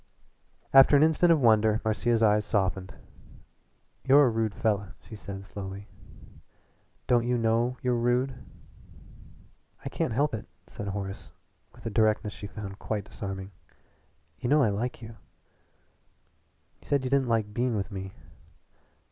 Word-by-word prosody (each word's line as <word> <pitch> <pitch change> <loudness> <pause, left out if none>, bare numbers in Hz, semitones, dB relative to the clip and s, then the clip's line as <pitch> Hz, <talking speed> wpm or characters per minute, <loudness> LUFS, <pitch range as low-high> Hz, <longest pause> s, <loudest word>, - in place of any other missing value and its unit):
After 135 +2 +8
an 145 - +5
instant 160 +2 +4
of 165 - +4
wonder 110 -2 +4
Marcia's 115 +1 +1
eyes 105 -1 +4
softened. 95 -3 -1 1.1
"You're 140 +2 +6
a - - +3
rude 110 -3 -1
fella!" 100 -3 -1
she 110 - -9
said 100 -2 -8
slowly. 100 0 -8 1.2
"Don't 120 -1 +2
you 125 0 +1
know 115 +2 +1
you're 125 -1 +1
rude?" 120 +2 +1 1.5
"I - - -2
can't - - -2
help 140 +4 +1
it," 110 - -5 0.2
said 105 - -8
Horace 100 0 -5 0.5
with - - -17
a 115 - -3
directness 110 0 +1
she 105 - -8
found 100 -1 -8
quite 105 -3 -3
disarming. 95 -1 -7 0.9
"You 120 - -2
know 150 0 +5
I 110 - +3
like 115 +4 -3
you." 115 0 -10 1.6
"You - - -20
said 140 -2 +1
you 130 - -3
didn't 135 -2 +2
like 110 -2 0
being 120 0 0
with 100 +1 -3
me." 95 -1 -6
110 Hz, 145 wpm, -27 LUFS, 100-125 Hz, 1.6 s, After